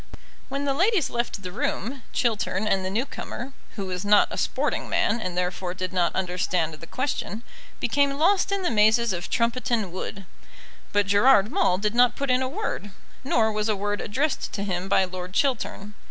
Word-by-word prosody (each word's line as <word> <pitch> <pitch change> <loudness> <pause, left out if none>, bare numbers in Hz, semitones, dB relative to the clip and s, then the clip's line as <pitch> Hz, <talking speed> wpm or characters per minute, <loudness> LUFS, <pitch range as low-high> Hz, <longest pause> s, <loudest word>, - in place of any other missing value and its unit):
When 275 +1 -2
the 275 - +1
ladies 365 - +2
left 235 -4 -2
the 180 - -5
room 245 +7 -3
Chiltern 215 -3 0
and 195 -2 +2
the 185 - -2
new 225 +7 0
comer 265 -1 -7 0.2
who 200 - -4
was 185 0 -4
not 205 0 +5
a - - -5
sporting - - -1
man, 235 - +1
and 180 -3 -4
therefore 180 0 -2
did 185 0 -4
not 175 -2 +1
understand 180 -3 0
the 160 +2 -10
question 255 - -3 0.4
became 280 -1 +1
lost 375 +6 +3
in 395 -1 0
the 355 - +1
mazes 220 0 +4
of 175 0 -4
Trumpeton 235 -4 0
Wood. 190 +2 -6 0.7
But 205 0 +2
Gerard 205 +1 +5
Maule 180 - +2
did 210 +2 -1
not 245 0 +4
put 280 -2 -1
in 250 +1 +3
a 260 - -1
word; 290 - -4 0.3
nor 225 -4 +2
was 215 +1 -1
a 215 - +2
word 205 +1 -2
addressed 270 +7 -1
to 200 - -2
him 185 -1 -3
by 190 - +4
Lord 180 0 -7
Chiltern. 215 -5 -1
210 Hz, 190 wpm, -25 LUFS, 185-255 Hz, 0.7 s, not